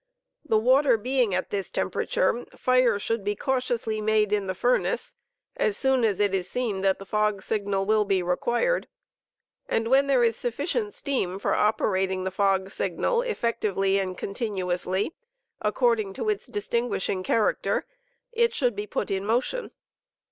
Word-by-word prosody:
The 250 -8 +2
water 255 +2 +4
being 245 -3 +1
at 185 - -2
this 195 -2 -2
temper - - -2
ature 240 - 0
fire 255 -4 +3
should 225 +1 -2
be 205 +1 -1
cautiously 240 -3 -1
made 215 -1 +2
in 205 -2 0
the 185 - -2
furnace 485 - 0 0.4
as 210 -2 +1
soon 265 -2 +2
as* 210 -4 +1
it 205 -2 +2
is 185 -1 -1
seen 225 -6 -2
that 190 -1 +2
the 195 - -10
fog 210 -1 0
signal 200 -2 -1
will 215 +1 +3
be 195 -3 +1
required, 240 - 0 0.8
and 225 - 0
when 275 +2 +4
there 265 -3 +4
is 230 -1 +2
sufficient 330 - -2
steam 195 -10 -2
for - - 0
operating 190 -3 +1
the 190 - -2
fog*signal 195 - 0
effectively 215 - 0
and 185 -2 -3
continuously, 190 - -2 0.5
according 450 -5 +1
to 435 - -2
its 420 - -2
distinguishing 235 - -1
character, 210 +3 +1 0.5
it 470 0 +2
should 245 -6 +1
be 205 +1 -4
put - - -3
in 195 0 -1
motion. 245 - -1
215 Hz, 155 wpm, -26 LUFS, 195-255 Hz, 0.8 s, water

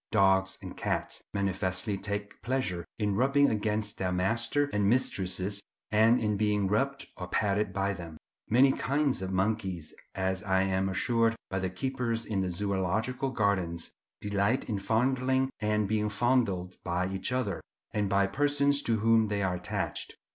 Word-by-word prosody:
Dogs 95 -2 +3
and - - -7
cats - - -2
manifestly 95 0 0
take 100 +1 -4
pleasure 100 -7 -1
in 105 -2 0
rubbing 140 +4 +4
against 105 0 -1
their 90 -1 0
masters 115 +10 +1
and 100 -1 +2
mistresses, 100 -4 0 0.3
and 110 +3 +5
in 105 -2 0
being 105 -1 +1
rubbed 135 +8 0
or 90 - -5
patted 105 +1 +1
by 100 +1 0
them. 85 -3 -8 0.3
Many 130 +4 +6
kinds 140 -3 0
of 95 0 -3
monkeys, 95 -4 -1 0.2
as 95 0 -1
I 95 -2 +2
am 95 0 0
assured 115 +4 +2 0.2
by 95 - 0
the 95 0 -1
keepers 120 +1 -2
in 100 -3 -1
the 95 - -1
Zoological 105 +8 -1
Gardens, 95 -8 0 0.3
delight 105 +5 0
in 105 -4 -1
fondling 130 +5 +1
and 105 -1 +1
being 105 0 0
fondled 105 -5 +1
by 90 +1 0
each 95 +3 -3
other, 125 -8 -1 0.3
and 105 -2 0
by 100 0 +3
persons 145 +5 +2
to 115 -5 0
whom 115 0 +4
they 100 -1 -1
are 95 -1 +1
attached. 90 0 -3
105 Hz, 155 wpm, -29 LUFS, 95-115 Hz, 0.3 s, Many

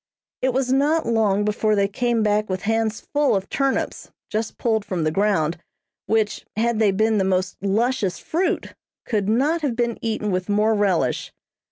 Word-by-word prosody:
It 260 - +2
was 260 0 0
not 295 +4 +2
long 210 -3 +2
before 210 0 +1
they 200 -1 +2
came 235 +2 0
back 210 0 +1
with 185 0 -3
hands 225 0 0
full 290 -5 +3
of 195 0 -2
turnips, 275 -1 -1 0.2
just 220 +1 -2
pulled 220 -3 0
from 185 -5 -2
the 155 - +1
ground, 175 -3 +1 0.5
which, 220 -1 0
had 230 +1 +1
they 215 -2 +4
been 215 +2 +2
the - - +2
most 185 -1 0
luscious 210 0 0
fruit, 350 +4 -2 0.3
could 210 -3 -1
not 290 +9 +2
have 275 -6 -1
been 235 -1 -1
eaten 220 -2 -2
with 185 +1 -2
more 210 +2 +3
relish. 200 -5 0
215 Hz, 175 wpm, -22 LUFS, 200-235 Hz, 0.5 s, they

